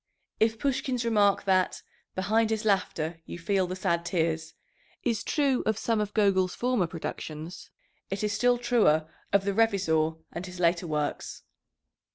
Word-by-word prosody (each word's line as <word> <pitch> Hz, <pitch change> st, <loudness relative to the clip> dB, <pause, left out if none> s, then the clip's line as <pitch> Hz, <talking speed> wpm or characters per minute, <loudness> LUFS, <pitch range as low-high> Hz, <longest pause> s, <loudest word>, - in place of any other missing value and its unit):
If 225 Hz, 0 st, +2 dB
Pushkin's 260 Hz, -2 st, -1 dB
remark, 205 Hz, -4 st, +3 dB
that 185 Hz, -1 st, +1 dB, 0.3 s
"behind 215 Hz, +4 st, +2 dB
his 220 Hz, 0 st, -1 dB
laughter 170 Hz, -5 st, 0 dB
you -, -, -6 dB
feel 185 Hz, +2 st, 0 dB
the 185 Hz, -, -4 dB
sad 170 Hz, -2 st, 0 dB
tears," 160 Hz, -2 st, -1 dB, 0.5 s
is 230 Hz, -3 st, 0 dB
true 280 Hz, -4 st, +1 dB
of 220 Hz, -1 st, +1 dB
some 225 Hz, -1 st, 0 dB
of 210 Hz, 0 st, -4 dB
Gogol's 190 Hz, -4 st, +2 dB
former 245 Hz, -7 st, +1 dB
productions, 160 Hz, 0 st, -7 dB, 0.4 s
it 195 Hz, +2 st, -3 dB
is 210 Hz, 0 st, 0 dB
still 245 Hz, +4 st, +3 dB
truer 225 Hz, -11 st, +3 dB, 0.2 s
of 200 Hz, -1 st, +3 dB
the 200 Hz, -, 0 dB
Revizor 185 Hz, -8 st, +2 dB, 0.2 s
and 170 Hz, -, -5 dB
his 180 Hz, -1 st, -8 dB
later 170 Hz, 0 st, +2 dB
works. 150 Hz, -2 st, -3 dB
195 Hz, 155 wpm, -28 LUFS, 170-225 Hz, 0.5 s, remark